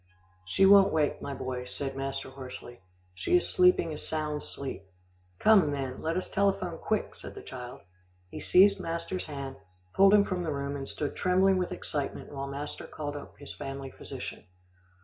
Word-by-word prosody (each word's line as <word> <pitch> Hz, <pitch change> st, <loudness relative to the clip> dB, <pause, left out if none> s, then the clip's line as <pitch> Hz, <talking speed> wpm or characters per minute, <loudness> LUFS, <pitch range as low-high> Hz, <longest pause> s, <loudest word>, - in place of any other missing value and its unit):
"She 95 Hz, -, +3 dB
won't 195 Hz, 0 st, +8 dB
wake, 150 Hz, -2 st, +1 dB
my 140 Hz, -, -4 dB
boy," 125 Hz, -1 st, -4 dB
said 135 Hz, +2 st, -4 dB
master 135 Hz, 0 st, -4 dB
hoarsely. 130 Hz, -3 st, -9 dB, 0.3 s
"She 90 Hz, -, +2 dB
is 175 Hz, -, -1 dB
sleeping 180 Hz, -3 st, +4 dB
a -, -, -5 dB
sound 150 Hz, -1 st, -2 dB
sleep." 135 Hz, -8 st, -5 dB, 0.6 s
"Come, 200 Hz, -, +5 dB
then, 135 Hz, -3 st, -3 dB
let 165 Hz, +2 st, -1 dB
us 185 Hz, -, -2 dB
telephone 190 Hz, -4 st, 0 dB
quick," 215 Hz, -1 st, -1 dB
said -, -, -10 dB
the -, -, -9 dB
child. 125 Hz, -1 st, -8 dB, 0.5 s
He -, -, -6 dB
seized 195 Hz, +2 st, +5 dB
master's 170 Hz, +2 st, -3 dB
hand, 140 Hz, -3 st, -6 dB, 0.4 s
pulled 195 Hz, +1 st, +7 dB
him 205 Hz, -1 st, +5 dB
from 185 Hz, -2 st, -2 dB
the 165 Hz, -3 st, -2 dB
room, 140 Hz, 0 st, -3 dB
and 135 Hz, -1 st, -5 dB
stood 150 Hz, -, -3 dB
trembling 185 Hz, +1 st, +3 dB
with 180 Hz, -, -2 dB
excitement 145 Hz, -3 st, -3 dB
while 140 Hz, 0 st, -4 dB
master 140 Hz, +2 st, -6 dB
called 145 Hz, -1 st, -5 dB
up 145 Hz, -, -9 dB
his 145 Hz, -, -8 dB
family 135 Hz, -1 st, -6 dB
physician. -, -, -8 dB
145 Hz, 175 wpm, -29 LUFS, 135-180 Hz, 0.6 s, won't